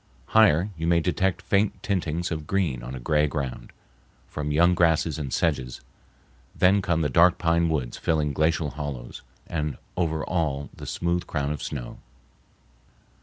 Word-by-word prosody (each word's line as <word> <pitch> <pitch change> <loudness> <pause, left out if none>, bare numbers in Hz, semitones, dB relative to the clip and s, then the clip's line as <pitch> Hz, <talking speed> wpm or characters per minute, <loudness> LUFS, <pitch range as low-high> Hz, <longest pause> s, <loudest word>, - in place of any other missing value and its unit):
Higher 105 -3 +4
you 80 +1 -3
may 85 0 +4
detect 90 +2 0
faint 100 +3 +1
tintings 85 -4 -1
of 80 -2 -4
green 85 -11 0
on 65 +2 -7
a - - -6
gray 75 +4 +2
ground, 70 -4 -4 0.6
from 75 0 -4
young 85 +4 +4
grasses 80 -2 +2
and 70 -3 -4
sedges; 65 -6 -1 0.8
then 95 +2 +4
come 85 -4 0
the 75 - +2
dark 85 +6 +5
pine 85 -1 +2
woods 70 -7 -2
filling 75 -3 0
glacial 80 +1 +1
hollows, 70 -5 -6 0.2
and 75 -3 -3 0.2
over 80 -3 -1
all 75 -5 -2
the - - -9
smooth 85 0 -1
crown 70 -2 -2
of 75 - -4
snow. - - -6
80 Hz, 155 wpm, -25 LUFS, 75-85 Hz, 0.8 s, dark